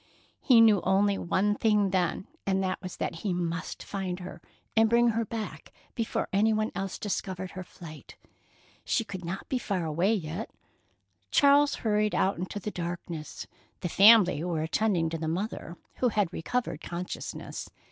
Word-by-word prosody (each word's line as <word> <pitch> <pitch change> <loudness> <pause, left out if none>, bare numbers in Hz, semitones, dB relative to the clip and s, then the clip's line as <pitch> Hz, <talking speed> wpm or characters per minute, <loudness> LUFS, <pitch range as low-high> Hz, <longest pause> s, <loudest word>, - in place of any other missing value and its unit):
He 245 -5 +6
knew 215 -4 +6
only 195 +1 +2
one 200 +3 +1
thing 210 -2 +2
then, 185 0 0 0.2
and 190 0 +1
that 185 -1 -2
was 185 -2 -7
that - - -3
he 185 +1 -2
must 175 0 -3
find 190 -2 -4
her 180 - -8 0.3
and 225 0 +5
bring 235 +1 +4
her 230 0 0
back 220 -1 -6 0.2
before 230 -3 -2
any 210 +3 +4
one 215 0 0
else 195 -1 -4
discovered 185 -2 -3
her 185 - -6
flight. 165 -3 -12 0.7
She 230 - +1
could 190 -4 -7
not 180 +3 -5
be 260 - -1
far 195 -7 -2
away 170 +8 +2
yet. 175 +3 -4 0.8
Charles 285 +1 +5
hurried 210 -1 +2
out 190 -2 +1
into 185 +3 -4
the 210 +2 -5
darkness. 170 -3 -5 0.4
The 175 - -2
family 200 -5 +6
were 170 -3 -1
attending 175 0 +1
to 165 - -3
the 160 - -3
mother, 175 0 -3 0.2
who 250 - +2
had 205 -5 0
recovered 235 -3 -2
consciousness. 175 +1 -6
195 Hz, 165 wpm, -28 LUFS, 175-215 Hz, 0.8 s, He